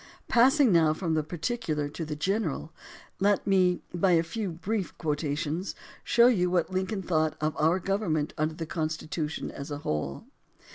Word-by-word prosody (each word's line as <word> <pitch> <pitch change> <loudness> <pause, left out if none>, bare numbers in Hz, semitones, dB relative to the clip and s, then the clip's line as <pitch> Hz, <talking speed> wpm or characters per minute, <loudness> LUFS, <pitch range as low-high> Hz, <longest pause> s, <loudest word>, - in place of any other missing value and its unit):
Passing 260 +1 +5
now 160 -3 +4
from 165 -1 -1
the 155 - +2
particular 155 -2 -2
to 165 - -5
the 155 -1 -4
general, 165 -2 -2 0.5
let 200 +1 +2
me 185 -2 +3
by 180 +1 +3
a 165 -1 +4
few 200 +4 -3
brief 190 +4 -3
quotations 150 +3 -2 0.3
show 235 - +5
you 190 -8 +4
what 175 0 +1
Lincoln 190 +2 -1
thought 155 -3 +1
of 155 0 -1
our 160 +4 +3
government 190 -6 -1
under 155 +1 -1
the 165 - -4
Constitution 155 -1 -3
as 140 +1 -7
a 145 - -3
whole. 75 -2 -2
165 Hz, 160 wpm, -28 LUFS, 155-195 Hz, 0.5 s, Passing